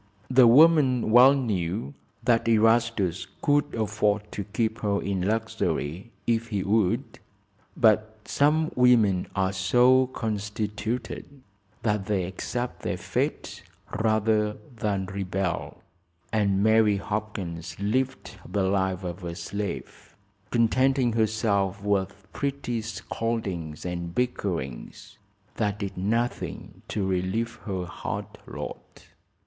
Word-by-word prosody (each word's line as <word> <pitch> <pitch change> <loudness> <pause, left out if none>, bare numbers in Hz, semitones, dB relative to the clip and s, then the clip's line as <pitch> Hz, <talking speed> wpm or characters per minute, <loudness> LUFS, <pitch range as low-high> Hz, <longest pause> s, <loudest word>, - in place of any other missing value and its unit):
The 130 -1 +7
woman 135 -3 +5
well 125 +4 +8
knew 105 - -2 0.3
that 115 -1 +2
Erastus 115 -5 +2 0.2
could 145 0 +2
afford 105 -1 0
to 100 - -4
keep 110 +2 -1
her 100 -1 0
in 95 -2 -2
luxury, 105 -3 -2 0.2
if 115 -1 +1
he 100 -4 -2
would, 100 -2 0 0.6
but 110 0 +3
some 155 +2 +2
women 115 -7 +4
are 95 0 +1
so 125 +7 +4
constituted 110 +3 -4 0.4
that 105 -3 0
they 100 -3 +1
accept 120 +7 -4
their - - -2
fate - - -3 0.4
rather 110 -1 +2 0.2
than 100 -3 -1
rebel, 95 -1 -3 0.5
and 100 -2 +2
Mary 110 -2 +4
Hopkins 95 -6 -5
lived 130 +6 -1
the 100 -2 0
life 95 -1 0
of 90 +1 -5
a 85 -1 -4
slave, 100 +2 -6 0.3
contenting 125 +1 +2
herself 105 -3 0
with 100 -1 -1
petty 140 -4 -2
scoldings 105 -8 -4
and 85 -1 -4
bickerings 90 - -3 0.4
that 105 -2 0
did 100 -2 -5
nothing 115 +6 -2
to 100 - -2
relieve 95 +5 -1
her 95 -4 -3
hard 90 - -5 0.2
lot. - - -8
105 Hz, 110 wpm, -26 LUFS, 95-115 Hz, 0.6 s, well